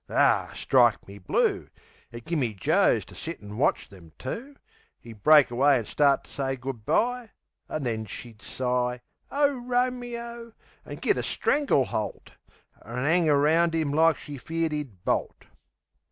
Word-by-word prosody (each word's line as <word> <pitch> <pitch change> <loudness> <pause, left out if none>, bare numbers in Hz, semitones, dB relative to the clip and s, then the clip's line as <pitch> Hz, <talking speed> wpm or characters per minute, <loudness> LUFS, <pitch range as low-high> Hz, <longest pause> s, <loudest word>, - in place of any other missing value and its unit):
Ar, - - +2
strike 120 -4 +3
me 100 +1 -11
blue! 90 - 0 0.4
It 120 -1 -10
gimme 140 -10 -1
Joes 160 - +2
to - - -15
sit 165 +1 -7
an' 105 +1 -10
watch - - +1
them 85 -5 -16
two! 255 - -6 0.5
'E'd 115 -3 -12
break 150 -2 +6
away 135 +3 +4
an' 115 - -3
start 140 +4 +2
to - - -18
say 135 -1 -2
good 125 -4 -7
bye, 245 -1 +1 0.4
An' 155 - -3
then 110 -3 -2
she'd 115 +2 -9
sigh 125 -1 -2 0.3
"Ow, 285 0 +3
Ro 250 -1 0
me 245 -1 -6
o!" 235 -1 -9 0.3
an' - - -7
git - - 0
a - - 0
strangle 280 - +1
holt, 105 -4 -5 0.5
An' 125 +4 -4
'ang 165 +1 +3
around 160 +4 +3
'im 155 -3 0
like 160 +1 +4
she 145 -2 -9
feared 165 +2 -2
'e'd 130 -12 -6
bolt. - - -1
145 Hz, 165 wpm, -26 LUFS, 120-175 Hz, 0.5 s, break